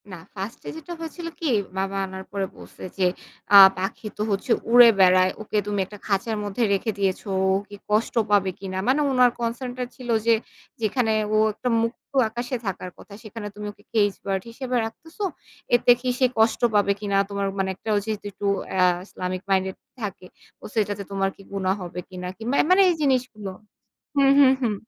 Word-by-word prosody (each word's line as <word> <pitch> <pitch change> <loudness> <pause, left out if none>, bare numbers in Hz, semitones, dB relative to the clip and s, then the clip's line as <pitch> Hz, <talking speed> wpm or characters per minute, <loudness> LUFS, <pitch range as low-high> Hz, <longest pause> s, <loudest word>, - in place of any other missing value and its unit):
না, 185 - -8 0.2
1st 195 +4 -5
এ - - -3
যেটা 320 +2 -8
হয়েছিল 330 +1 -6
কি? 325 - -1 0.3
বাবা 195 +1 -1
আনার 190 0 -8
পরে 200 -1 -1
বলছে - - -13
যে, 185 -2 +3 0.5
আ - - +12 0.2
"পাখি 195 +3 -4
তো - - -4
হচ্ছে 200 +6 -2 0.2
উড়ে 240 0 +9
বেড়ায়। 185 0 +5
ওকে 215 0 -3
তুমি 205 -1 -1
একটা 210 +2 -12
খাঁচার 215 +2 0
মধ্যে 205 +4 -2
রেখে 210 +3 0
দিয়েছো, 195 +1 -1 0.2
ও - - +3 0.2
কি 205 - -9
কষ্ট 215 +2 +1 0.2
পাবে 200 -2 +4
কিনা?" 190 -1 -5
মানে 270 +4 +3
উনার 250 -2 +5
কনসার্ন 240 +2 -3
টা 250 - -1
ছিল 250 -2 -10 0.2
যে, 230 - +5 0.5
"যেখানে 220 +1 +1 0.2
ও - - +4 0.2
একটা 250 +4 -3
মুক্ত 230 +2 -5 0.2
আকাশে 240 +3 -4
থাকার 185 -2 -4
কথা, 200 - -14
সেখানে 215 -1 -7
তুমি 210 0 -7
ওকে 205 - -23
কেইস 205 -3 +3
বার্ড 195 -1 -1
হিসেবে 255 +1 -4
রাখতেস, 320 +9 -11 0.6
এতে 240 0 +5
কি 255 - -1
সে 260 - +5
কষ্ট 220 0 +3
পাবে 205 -1 +4
কিনা? 200 -1 0
তোমার 200 -1 -2
মানে 190 0 0
একটা" 220 - -8
ও - - +3
যেহেতু 215 -2 -4
একটু 200 +1 -7 0.3
অ্যা 185 -1 +3 0.2
ইসলামিক 185 -1 -4
মাইন্ডেড 190 -1 +1 0.3
থাকে। 195 -3 -5 0.4
ও - - -8
"সেটাতে 205 -2 -1
তোমার 195 -1 0
কি - - -16
গুনাহ 190 -1 0
হবে 180 0 -6
কিনা?" 180 -1 -6
কিংবা 235 +5 -2
এ - - +1
মানে 375 +2 +7
এই 350 - +2
জিনিসগুলো 250 -7 0 0.7
হুম, 275 -1 +5
হুম, 265 -2 +7
হুম। 225 -4 +1
210 Hz, 195 wpm, -24 LUFS, 195-240 Hz, 0.7 s, আ